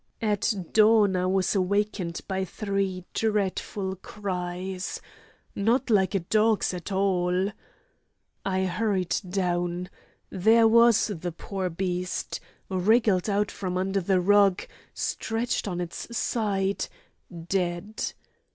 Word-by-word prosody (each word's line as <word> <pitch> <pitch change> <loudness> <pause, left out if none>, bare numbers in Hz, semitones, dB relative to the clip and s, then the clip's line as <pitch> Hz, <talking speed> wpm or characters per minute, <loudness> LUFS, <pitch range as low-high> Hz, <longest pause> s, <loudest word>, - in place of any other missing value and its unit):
At 210 +1 +1 0.2
dawn 215 -2 +5
I 180 0 +1
was 190 -1 +1
awakened 195 -2 0
by 190 -1 -1
three 195 -1 -2
dreadful 200 -2 -1
cries—not 185 -1 -4 0.9
like 195 -2 +3
a - - +3
dog's 215 +3 +2
at 180 +2 -6
all. 190 0 +1 0.9
I 190 -1 0
hurried 190 -1 0
down. 180 -1 -1 0.4
There 225 +4 +5
was 235 0 +5
the 175 0 -4
poor 190 +2 -4
beast—wriggled 185 +3 0
out 205 0 +1
from 180 -2 -3
under 190 +1 0
the 185 +1 +2
rug 200 0 +4 0.3
stretched 225 0 -2
on 180 -3 -3
its 180 +7 -5
side, 200 -5 0 0.6
dead. 180 +3 -2
190 Hz, 105 wpm, -26 LUFS, 180-210 Hz, 0.9 s, dawn